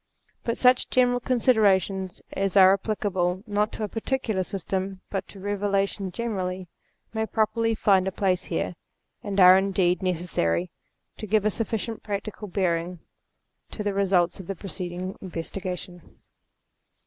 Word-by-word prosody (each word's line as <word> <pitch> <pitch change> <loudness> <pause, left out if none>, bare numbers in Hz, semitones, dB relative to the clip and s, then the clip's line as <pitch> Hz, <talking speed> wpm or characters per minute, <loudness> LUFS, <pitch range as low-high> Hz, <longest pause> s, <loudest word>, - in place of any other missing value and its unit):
But 230 - -1
such 250 0 +4
general 245 -1 +3
considerations 205 -7 +2
as 195 0 0
are 190 0 +8
applicable 190 -3 -1
not 210 -1 0
to - - -4
a - - 0
particular 225 -2 -2
system, 190 +1 -3
but 195 -1 -3
to - - -13
Eevelation 200 -1 -1
generally, 185 -5 -3 0.5
may 220 0 -1
properly 225 +1 +1
find 195 -3 +3
a - - 0
place 185 -1 0
here, 170 - -2 0.5
and 200 -1 -2
are 185 0 +9
indeed 185 -2 +1
ne 185 -1 +1
cessary 90 - -1 0.5
to 215 - -6
give 210 0 +2
a 215 - +3
sufficiently 225 0 -3
practical 210 +1 -5
bearing 180 -2 -1 0.7
to 210 - -5
the 205 -1 -1
results 190 -3 +2
of 185 - -9
the 195 - -3
preceding 180 +1 -5
investigation. 180 0 -5
195 Hz, 140 wpm, -26 LUFS, 185-215 Hz, 0.7 s, are